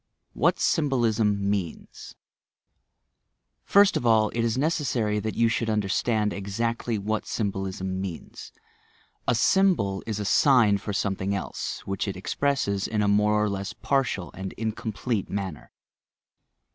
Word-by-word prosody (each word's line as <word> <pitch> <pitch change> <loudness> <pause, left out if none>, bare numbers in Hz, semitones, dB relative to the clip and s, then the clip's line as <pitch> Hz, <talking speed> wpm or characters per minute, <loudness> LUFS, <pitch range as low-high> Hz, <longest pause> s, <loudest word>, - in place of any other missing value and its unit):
WHAT - - +2
SYMBOLISM 115 - +1
MEANS 100 -5 -4 1.5
First 200 0 +5
of - - -1
all, 110 -2 +4
it 120 - -5
is 115 +1 0
necessary 130 -8 0
that 110 +1 -4
you 115 - +3
should 115 0 -1
understand 105 +1 0
exactly 115 +3 -2
what 105 +2 -2
symbolism 95 -2 -3
means. 90 -4 -7 0.8
A 125 - +3
"symbol" 125 - +2
is 110 -2 -2
a 105 - -3
sign 110 -3 +4
for 105 - -5
something 100 -1 -1
else 95 - -5
which 100 +1 -2
it 95 - -4
expresses 100 -2 -1
in 105 -1 0
a - - +1
more 105 +1 +3
or - - +1
less 100 0 -4
partial 130 -10 -1
and 95 +1 -6
incomplete 110 0 -3
manner. 95 -6 -5
105 Hz, 135 wpm, -26 LUFS, 100-115 Hz, 1.5 s, First